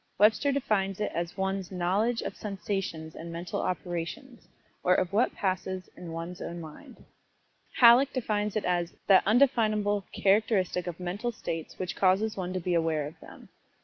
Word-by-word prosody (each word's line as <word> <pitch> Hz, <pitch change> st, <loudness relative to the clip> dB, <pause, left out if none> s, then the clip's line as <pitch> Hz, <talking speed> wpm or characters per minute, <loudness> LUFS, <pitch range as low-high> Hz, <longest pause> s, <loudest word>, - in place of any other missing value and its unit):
Webster 215 Hz, +8 st, +4 dB
defines 200 Hz, -8 st, 0 dB
it 210 Hz, -, -1 dB
as 170 Hz, +2 st, -3 dB
one's 190 Hz, -1 st, -2 dB
"knowledge 195 Hz, +6 st, 0 dB
of -, -, -5 dB
sensations 195 Hz, -6 st, -4 dB
and 170 Hz, +1 st, -8 dB
mental 170 Hz, +1 st, -4 dB
operations, 180 Hz, -, -4 dB, 0.4 s
or 180 Hz, 0 st, +4 dB
of 185 Hz, +1 st, 0 dB
what 230 Hz, +5 st, +2 dB
passes 185 Hz, -1 st, -2 dB
in 175 Hz, -2 st, -8 dB
one's 165 Hz, +2 st, -6 dB
own 170 Hz, -, -5 dB
mind." 155 Hz, -2 st, -12 dB, 0.7 s
Halleck 250 Hz, +3 st, +7 dB
defines 210 Hz, -5 st, -1 dB
it 215 Hz, -, -1 dB
as 175 Hz, -1 st, 0 dB
"that 195 Hz, -2 st, +7 dB
undefinable 215 Hz, -5 st, +3 dB
characteristic 195 Hz, -3 st, +2 dB
of 175 Hz, 0 st, -5 dB
mental 195 Hz, +7 st, -3 dB
states 165 Hz, -7 st, -5 dB
which 185 Hz, -1 st, -4 dB
causes 200 Hz, +3 st, +2 dB
one 185 Hz, -2 st, -3 dB
to 185 Hz, -, -2 dB
be 180 Hz, 0 st, -1 dB
aware 160 Hz, -3 st, +1 dB
of 160 Hz, +3 st, -9 dB
them." -, -, -14 dB
190 Hz, 160 wpm, -28 LUFS, 175-215 Hz, 0.7 s, Halleck